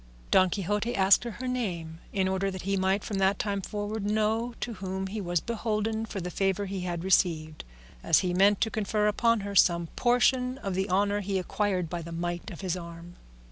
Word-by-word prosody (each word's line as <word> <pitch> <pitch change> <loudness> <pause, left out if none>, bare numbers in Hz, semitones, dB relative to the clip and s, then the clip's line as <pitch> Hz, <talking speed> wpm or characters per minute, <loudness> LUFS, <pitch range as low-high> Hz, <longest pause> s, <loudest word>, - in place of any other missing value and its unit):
Don 185 -1 +5
Quixote 210 +5 -1
asked 195 +4 +5
her 240 +2 -5
name 175 -10 -3
in 190 -2 +1
order 190 +1 0
that 190 -1 -6
he 195 +1 0
might 190 +1 +1
from 200 -3 -3
that 190 0 +3
time 200 -2 -2
forward 205 +1 -4
know 220 +3 0
to 240 - -4
whom 190 -1 -4
he 205 +2 -4
was 175 -2 0
beholden 220 +1 -2
for 200 - -5
the 180 0 -5
favour 195 +2 0
he 195 0 -4
had 175 -2 -3
received, 160 -5 +1 0.4
as - - +4
he 180 -1 -1
meant 195 +2 +4
to 220 - +1
confer 210 0 0
upon 230 +1 +2
her 200 0 -5
some 170 -3 +4
portion 250 +1 +2
of 200 -8 -4
the 190 +2 -1
honour 200 +2 +2
he 200 -1 -2
acquired 185 -1 -1
by 175 +1 -4
the 170 +1 -8
might 175 +3 -3
of 185 - -9
his 185 -2 -1
arm. 170 0 -9
195 Hz, 205 wpm, -28 LUFS, 180-215 Hz, 0.4 s, Don